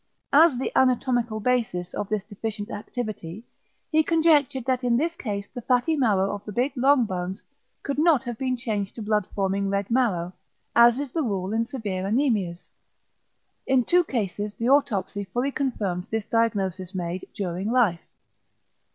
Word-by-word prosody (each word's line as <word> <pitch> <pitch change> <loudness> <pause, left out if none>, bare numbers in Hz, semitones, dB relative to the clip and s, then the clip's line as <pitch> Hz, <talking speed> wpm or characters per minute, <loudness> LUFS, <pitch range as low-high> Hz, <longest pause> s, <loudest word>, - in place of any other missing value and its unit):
As 305 -2 +6
the 260 - -2
anatomical 245 -3 +2
basis 215 -7 -1
of 205 - -4
this 215 -2 -1
deficient 210 +1 -5
activity, 210 -3 -6 0.5
he 315 0 +5
conjectured 300 -5 +3
that 260 -1 0
in 240 -1 +3
this 330 +5 0
case 205 - -4
the 245 - -6
fatty 250 +7 +2
marrow 205 -8 +2
of 205 - -6
the 210 - -7
big 250 +7 0
long 265 0 +4
bones 185 -1 -4 0.4
could 280 0 -2
not 310 -5 +4
have 240 -3 -6
been 255 -1 -1
changed 210 -5 -3
to 225 - -6
blood 210 -2 0
forming 195 0 0
red 200 +2 -2
marrow, 190 -8 +1 0.4
as 235 +1 +7
is 280 -2 -4
the 325 - -1
rule 200 -6 -2
in 230 +1 0
severe 205 -8 -4
anæmias. 205 -7 0 1.0
In 260 -2 +3
two 355 +7 +4
cases 210 - -3
the 230 +2 -1
autopsy 205 -8 +1
fully 245 +9 -1
confirmed 205 -11 -2
this 220 -2 -2
diagnosis 195 -5 -1
made 180 0 -4
during 190 +1 -3
life. 220 -10 +2
225 Hz, 160 wpm, -25 LUFS, 195-260 Hz, 1.0 s, as